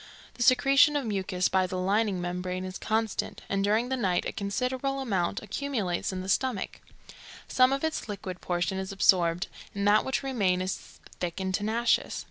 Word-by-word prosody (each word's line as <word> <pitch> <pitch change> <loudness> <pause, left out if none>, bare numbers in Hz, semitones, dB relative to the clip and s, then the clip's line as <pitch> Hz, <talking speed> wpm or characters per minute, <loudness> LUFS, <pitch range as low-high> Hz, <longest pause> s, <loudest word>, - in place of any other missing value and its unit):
The - - -10
secretion 275 +5 +5
of 285 -3 0
mucus 190 -3 0
by 190 -1 +2
the 185 - -4
lining 200 +1 +1
membrane 180 +1 -3
is 185 0 -6
constant, 220 -1 -1
and 195 0 0
during 220 +4 +2
the 265 - 0
night 190 -8 0
a - - -2
considerable 255 +7 -2
amount 200 -7 -1
accumulates 215 -6 -2
in 185 -1 -4
the 185 - -7
stomach; 240 0 -1 0.7
some 255 0 +4
of 275 +2 -1
its 320 -7 -2
liquid 185 -3 -6
portion 180 +2 -1
is 190 +1 -4
absorbed, 180 -3 +3 0.3
and 200 0 0
that 210 +1 +5
which 265 +1 -1
remains 195 -9 +1
is - - -9 0.2
thick 175 0 -3
and 190 0 -2
tenacious. 220 +5 +1
200 Hz, 175 wpm, -28 LUFS, 185-250 Hz, 0.7 s, secretion